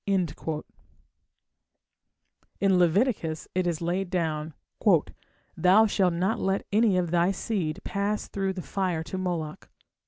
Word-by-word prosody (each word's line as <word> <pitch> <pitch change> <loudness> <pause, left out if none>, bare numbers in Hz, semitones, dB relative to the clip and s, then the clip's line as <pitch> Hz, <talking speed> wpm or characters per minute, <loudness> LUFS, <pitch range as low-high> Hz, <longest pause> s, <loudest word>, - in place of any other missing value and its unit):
In 190 -3 +2 2.3
Leviticus 185 -2 +2
it 185 -1 0
is 170 -2 -1
laid 180 +2 -1
down: 160 -3 -2 1.0
"Thou 190 +5 +5
shalt 190 -4 +2
not 190 +6 0
let 195 +1 0
any 210 -2 +3
of 175 -2 0
thy 175 +1 +3
seed 190 -5 -2
pass 200 +1 -2
through 195 -1 -2
the 185 -2 -6
fire 180 -5 -1
to 175 +4 -6
Moloch". 170 -4 -4
185 Hz, 120 wpm, -27 LUFS, 170-195 Hz, 2.3 s, Thou